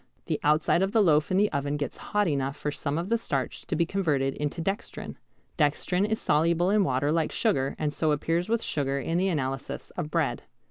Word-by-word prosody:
The 155 - -1
outside 150 +3 +3
of 195 +2 0
the 225 - +4
loaf 155 -4 +3
in 185 - +2
the 205 +1 +3
oven 145 0 -1
gets 145 -3 -4
hot 205 -1 +2
enough 140 -2 -1
for 150 - -2
some 145 +1 -3
of 175 +4 -3
the 230 0 +2
starch 135 - -3
to - - -1
be 170 - +2
converted 150 -8 0
into 150 +3 -3
dextrin. 195 +5 -4 0.4
Dextrin 170 +6 +2
is 220 0 -1
soluble 170 +4 +2
in 210 -1 +4
water 135 -1 +1
like 160 -1 +1
sugar 140 - 0
and 150 -1 -1
so 155 +1 +1
appears 165 +5 0
with 230 0 +1
sugar 140 -2 -1
in 165 +6 -1
the 190 - +2
analyses 135 -6 -3
of 165 -4 -4
bread. - - 0
155 Hz, 215 wpm, -27 LUFS, 145-185 Hz, 0.4 s, the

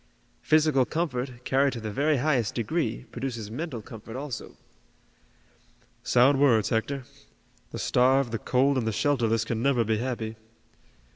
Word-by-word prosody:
Physical 155 -4 +3
comfort, 135 -2 -2
carried 135 +1 +2
to 120 - -5
the 110 -1 -5
very 145 +6 +1
highest 125 -6 0
degree, 120 0 -2
produces 120 -4 -5
mental 130 -3 -5
comfort 115 +2 -10
also." 135 -3 -6 1.4
"Sound 135 +3 +4
words, 120 -7 +4
Hector. 130 +4 -1 0.7
The - - -7
starved, 130 0 +2
the 115 - -2
cold 135 +1 +2
and 115 - -2
the 110 - 0
shelterless 115 -4 +1
can 115 -1 -2
never 130 -2 +2
be 110 -1 0
happy. 115 -3 -4
125 Hz, 140 wpm, -27 LUFS, 115-140 Hz, 1.4 s, Sound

